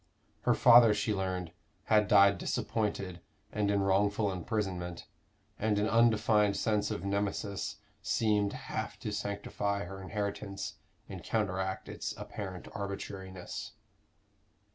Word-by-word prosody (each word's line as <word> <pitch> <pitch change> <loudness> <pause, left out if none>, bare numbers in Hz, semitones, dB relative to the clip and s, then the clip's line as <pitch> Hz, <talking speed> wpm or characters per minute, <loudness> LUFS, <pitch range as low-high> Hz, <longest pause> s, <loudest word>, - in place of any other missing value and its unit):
Her - - +4
father, 120 -3 +8
she 105 +1 0
learned, 95 -3 -2 0.3
had 105 -1 +3
died 100 -1 +6
disappointed 105 -5 -2 0.3
and 105 -1 0
in 100 -1 +2
wrongful 100 +1 +2
imprisonment, 90 -3 -3 0.5
and 105 -1 +1
an 105 +1 +2
undefined 110 -3 +4
sense 105 -2 +1
of 105 -2 -4
Nemesis 100 0 -2 0.3
seemed 105 -2 +1
half - - -5
to 105 - -3
sanctify 100 0 -2
her 95 +2 -8
inheritance, 100 0 -4 0.3
and - - -8
counteract 95 -3 -1
its - - -5
apparent 95 -3 -6
arbitrariness. 95 -3 -6
100 Hz, 115 wpm, -31 LUFS, 95-105 Hz, 0.5 s, father